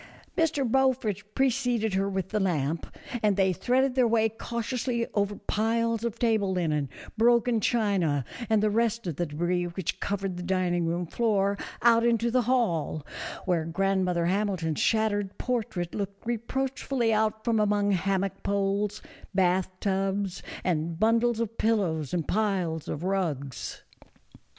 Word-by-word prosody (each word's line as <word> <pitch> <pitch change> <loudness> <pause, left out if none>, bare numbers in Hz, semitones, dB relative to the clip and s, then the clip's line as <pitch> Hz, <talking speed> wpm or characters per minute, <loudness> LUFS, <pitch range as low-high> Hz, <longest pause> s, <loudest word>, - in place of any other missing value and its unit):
Mr. 295 -5 +1
Beaufort 260 -4 +1
preceded 245 -5 +1
her 195 +1 +1
with 190 -1 -2
the 215 - 0
lamp, 160 -5 0 0.3
and 210 -3 +2
they 190 -1 +3
threaded 255 +7 +1
their 255 -2 +3
way 225 -1 +3
cautiously 235 +2 -2
over 205 0 0
piles 230 +2 0
of 235 -3 -2
table 220 -5 +2
linen, 155 -6 0 0.3
broken 235 0 +4
china 195 - +1 0.2
and 215 -1 +3
the 215 - +4
rest 230 0 +1
of 170 -5 -3
the 175 - -1
debris 175 +4 -1
which 175 0 -3
covered 195 -2 -2
the - - -5
dining 175 -2 0
room 175 +2 -1
floor 200 0 +1 0.3
out 230 -1 +6
into 235 0 +2
the 255 +1 +3
hall, 210 - 0 0.4
where 175 -4 +1
grandmother 180 0 +1
Hamilton's 185 -4 0
shattered 205 -3 +1
portrait 220 -8 -2
looked 200 0 -5
reproachfully 240 +1 -1
out 220 +1 0
from 230 -2 +2
among 205 -1 +2
hammock 195 +1 0
poles, 200 +1 -1 0.3
bath 185 -1 +2
tubs, 195 -1 -1 0.2
and 165 -1 -1
bundles 230 +1 +3
of 230 -1 -3
pillows 180 - +1
and 170 -4 -1
piles 185 -7 0
of 150 - -4
rugs. 160 -9 -2
200 Hz, 140 wpm, -27 LUFS, 180-230 Hz, 0.4 s, out